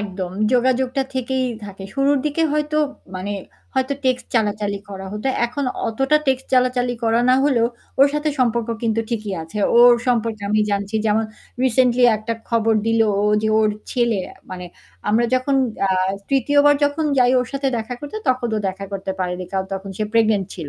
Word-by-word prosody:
একদম, 190 -3 -4 0.2
যোগাযোগটা 255 +1 +2
থেকেই 260 0 -1 0.2
থাকে। 195 -1 -9
শুরুর 275 +1 +2
দিকে 300 +2 0
হয়তো 300 0 -1 0.4
মানে 195 +3 -4 0.4
হয়তো 265 +1 0
টেক্সট 255 -1 0
চালাচালি 210 -2 0
করা 195 -1 -7
হত। 210 0 -6 0.2
এখন 280 +4 -4 0.2
অতটা 270 +6 +2
টেক্সট 265 0 0
চালাচালি 250 -1 +2
করা 225 +1 +3
না 255 - +6
হলেও 245 -5 +3 0.3
ওর 275 - +8
সাথে 300 +1 0
সম্পর্ক 235 -2 +1
কিন্তু 225 -1 +1
ঠিকই 215 -3 -3
আছে। 165 +6 -7 0.2
ওর 240 0 +8
সম্পর্কে 230 -3 0
আমি 215 0 +3
জানছি 200 +1 -2
যেমন 215 +1 +2 0.4
রিসেন্টলি 250 0 +3
একটা 215 +2 -4 0.2
খবর 225 -1 +2
দিল 225 0 +2 0.2
ও - - +1 0.2
যে 220 - +1
ওর 215 - +3 0.2
ছেলে, 235 -5 +1 0.3
মানে 180 -1 -6 0.4
আমরা 225 +3 +3
যখন 255 +2 +1 0.3
আ - - 0 0.4
৩য় 275 +1 +2
বার 290 - +6
যখন 290 +2 0
যাই 250 0 +4
ওর 250 - -3
সাথে 275 0 0
দেখা 230 +2 -4
করতে 290 +8 -7
তখন 255 -2 +1
ও - - +1
দেখা 190 +1 -6
করতে 195 0 -4
পারেনি। 180 0 -2
কারণ 190 0 -1
তখন 195 +1 -6
সে 215 - 0
প্রেগন্যান্ট 215 -4 +2
ছিল। 160 -5 -6
235 Hz, 175 wpm, -21 LUFS, 210-260 Hz, 0.4 s, ওর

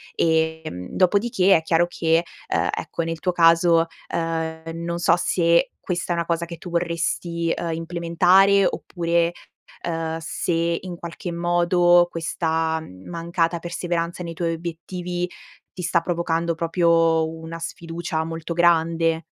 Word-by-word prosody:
Ehm, 160 - 0
dopodiché 195 0 +3
è 160 - +3
chiaro 165 +1 +2
che, 165 -1 +1 0.2
ehm, - - 0
ecco, 170 - -4
nel 165 0 -4
tuo 180 - 0
caso, 165 -1 +5 0.2
ehm, 160 -1 -3 0.2
non 170 0 -2
so 170 0 +4
se 170 -1 +2
questa 175 -1 -2
è - - -1
una 170 0 -1
cosa 170 0 -1
che 170 0 -8
tu 175 - -9
vorresti, 170 0 -1
ehm, 170 -1 -2
implementare 175 +4 +3
oppure, 170 -1 0 0.5
ehm, 165 -1 -2
se, 170 +1 -1
in 180 -1 -6
qualche 170 +1 -7
modo, 175 0 +4
questa 160 -1 -1 0.3
mancata 170 0 -1
perseveranza 170 0 -3
nei 170 -1 -5
tuoi 165 0 -1
obiettivi 175 +2 -4 0.4
ti 180 - -7
sta 175 0 +2
provocando 170 -1 -1
proprio 165 -1 +2
una 160 +1 -8
sfiducia 165 0 -4
molto 165 +1 -5
grande. 165 -1 +2
170 Hz, 135 wpm, -23 LUFS, 165-175 Hz, 0.5 s, caso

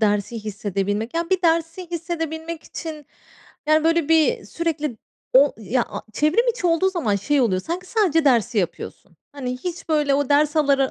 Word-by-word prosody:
dersi 210 +1 0
hissedebilmek, 205 - -2
ya 335 +2 -2
bir 375 -1 +2
dersi 335 +1 0
hissedebilmek 325 -1 -4
için 310 -4 -8 0.6
yani, 310 0 +4
böyle, 330 -2 +2
bir 320 -9 +3
sürekli 300 +1 -3 0.4
o 275 +2 +6
ya 230 +4 0
a - - -6
çevrim 310 - +2
içi 470 -6 0
olduğu 340 +3 +3
zaman 255 - 0
şey 280 +9 +1
oluyo,r 195 -7 +2
sanki 355 - -5
sadece 360 -8 +2
dersi 235 -5 +3
yapıyorsun. 180 - -4 0.2
Hani, 260 -3 -4
hiç 350 +5 -6
böyle, 300 -3 +2
o 285 -1 0
ders 295 +2 +3
alara 275 -3 +3
300 Hz, 165 wpm, -22 LUFS, 245-335 Hz, 0.6 s, o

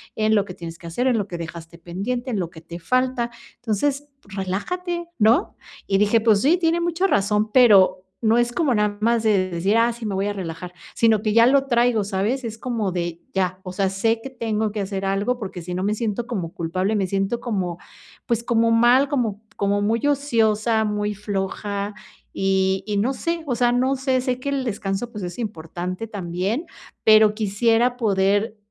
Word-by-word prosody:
en 220 0 +2
lo 205 -1 +2
que 180 - -8
tienes 165 -1 -8
que - - -14
hacer, 245 +10 -1
en 245 -3 +3
lo 205 - -2
que 175 -3 -6
dejaste 165 0 -8
pendiente, 220 +10 -4
en 205 - -1
lo 170 - -2
que 160 -1 -13
te 170 +1 -9
falta, 255 +4 0 0.3
entonces, 280 +6 -1 0.2
relájate, 335 - -3
¿no?" 220 +2 +6 0.5
Y 195 - +2
dije, 210 +3 +3
pues 215 -3 +4
sí, 315 +6 +4
tiene 335 -1 +1
mucha 345 +3 +1
razón, 210 - +1
pero 195 -7 +5 0.2
no 225 0 +3
es 240 0 +1
como 300 -7 +1
nada 210 -1 0
más 230 +1 +2
de 195 -4 +2
decir: 185 +4 0
"Ah, 230 +1 +3
sí, 230 -1 -8
me 200 -3 -2
voy 195 +1 0
a 205 - -1
relajar", 180 -2 -6 0.2
sino 225 -2 +3
que 215 -1 0
ya 230 +1 +6
lo 275 +1 +4
traigo, 240 -3 +2
¿sabes? 205 +7 -1
Es 225 -1 -5
como 225 -5 -2
de 170 -1 -3
ya, 185 -1 -1
o 185 -1 -7
sea, 195 0 +1
sé 225 +4 0
que 270 - -6
tengo 220 -3 -1
que 210 - -4
hacer 195 0 -4
algo 200 +6 0
porque 190 -5 -6
si 180 +1 -6
no 185 - -2
me 205 +2 +1
siento 230 +1 -2
como 180 -9 -4
culpable, 185 +5 -1
me 195 - +1
siento 195 +5 -1
como, 190 -7 -2 0.5
pues, 235 -1 0
como 230 -1 +2
mal, 245 +4 +5
como 225 -7 -1
como 200 0 +1
muy 225 +5 0
ociosa, 225 -6 +2
muy 210 0 -1
floja, 200 0 -3 0.4
y 190 0 +1
y 210 - -1
no 225 +6 +1
sé, 335 +4 -3
o 255 - -1
sea, 240 0 +2
no 260 +2 +2
sé, 260 -1 +1
sé 250 -1 -2
que 280 - -3
el 275 -1 -1
descanso, 200 +1 -3
pues, 210 -4 -7
es 175 -1 -6
importante 185 -1 -5
también, 200 - -3 0.4
pero 215 -1 +6
quisiera 225 +4 +1
poder 205 0 +1
215 Hz, 200 wpm, -22 LUFS, 195-240 Hz, 0.5 s, no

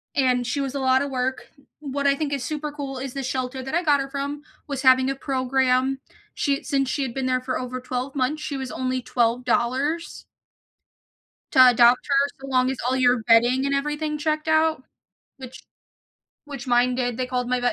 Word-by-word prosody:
And 250 -3 +2
she 280 +4 -2
was 275 0 -4
a - - -1
lotta 265 +1 +2
work. 260 -1 -3 0.3
What 280 -1 -4
I 275 - +4
think 290 0 -3
is 280 -3 -2
super 300 0 -4
cool 275 -3 -6
is 265 -1 -5
the 275 -1 -4
shelter 260 0 -3
that 265 +3 -7
I 345 - +1
got 295 -3 +3
her 275 0 -4
from 285 +1 -4 0.2
was 280 -2 -4
having 260 0 +5
a 275 - -1
program, 265 0 0 0.4
she 280 +2 -1
since 275 -2 0
she 280 - -1
had 250 -3 -4
been 265 0 -3
there 255 0 0
for 255 0 -3
over 255 0 -5
12 255 +2 -4
months, 280 +3 -1
she 285 -2 -4
was 265 -1 -5
only 255 0 -2
$12 250 +6 -1 1.3
to - - +2
adopt 245 +1 +4
her 280 0 +2
so 270 - -9
long 255 -1 +2
as 265 - -5
all 255 - +1
your 250 -2 +3
bedding 240 +4 +4
and 280 0 +1
everything 295 +2 -2
checked 310 +1 -2
out, 315 -2 +2 0.5
which 260 -2 -11 0.8
which 275 -4 -8
mine 245 0 +3
did. 245 -2 -1
They 255 - -1
called 250 -1 -2
my 250 0 0
vet 245 0 +1
265 Hz, 200 wpm, -23 LUFS, 255-280 Hz, 1.3 s, having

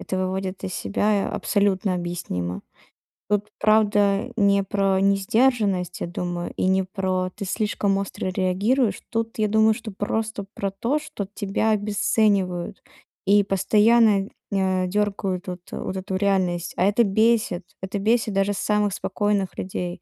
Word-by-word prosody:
это 190 - -4
выводит 185 0 -3
из 185 - -4
себя, 205 0 0
а - - -5
абсолютно 200 -2 +1
объяснимо. 175 - -4 0.7
Тут, 205 0 +1
правда, 210 +1 +3
не 200 -2 +3
про 195 -1 +1
несдержанность, 195 -2 +1
я - - -2
думаю, 175 0 -4
и - - 0
не 190 0 +3
про 185 -1 -2
"ты 205 - -5
слишком 200 0 0
остро 195 -1 -4
реагируешь". 200 +5 +1
Тут, 225 -1 -3
я 215 - +2
думаю, 220 +1 +4
что 225 -1 -7
просто 210 +1 -3
про 195 -1 -3
то, 230 +9 -1
что 210 -10 -6
тебя 205 +2 -1
обесценивают 205 -3 0 0.4
и 205 +1 +5
постоянно, 210 +1 +3 0.2
э, 190 -2 +1
дёргают 195 -1 -1
вот 180 -1 -5
э, - - -5
вот 190 - -4
эту 190 0 -4
реальность. 185 -3 0
А 180 - +3
это 205 +4 +4
бесит. 215 -3 +2 0.2
Это 195 +1 -3
бесит 220 0 +1
даже 195 +1 +1
самых 210 0 0
спокойных 200 -1 -1
людей. 180 -1 -4
200 Hz, 145 wpm, -23 LUFS, 185-210 Hz, 0.7 s, и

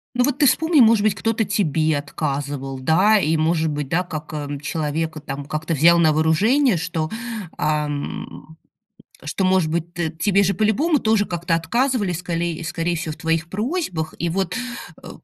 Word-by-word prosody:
Ну, 245 - +3
вот 280 +1 0
ты 295 - +5
вспомни, 320 +3 +3
может 220 -2 +5
быть, 215 - +2
кто-то 225 0 0
тебе 160 -6 +1
отказывал, 140 -2 -4
да, 185 +11 +4
и, 160 -3 +1
может 160 0 +1
быть, 145 -2 -3
да, 175 +5 +1
как, 155 -3 -7
а, 150 -1 -4
человек 155 +1 -2
там 140 0 -5
как-то 155 +2 -3
взял 170 +3 +5
на 160 -2 +4
вооружение, 200 - +3
что, 165 -2 -3 0.5
ам, 150 +1 -3 0.7
что 155 +6 -1
может 185 -3 +2
быть, 170 +1 -3
т 170 -2 -2
тебе 195 +5 +1
же 195 +1 +1
по-любому 270 - +2
тоже 220 -3 +2
как-то 175 -1 -2
отказывали, 225 +5 0
сколей 170 -1 -3
скорее 165 +1 -2
всего, 160 -2 -4
в - - -14
твоих 165 0 -1
просьбах. 210 - -3
И 170 - -1
вот, 185 +1 -1 0.5
э, - - -9
165 Hz, 170 wpm, -21 LUFS, 155-200 Hz, 0.7 s, ты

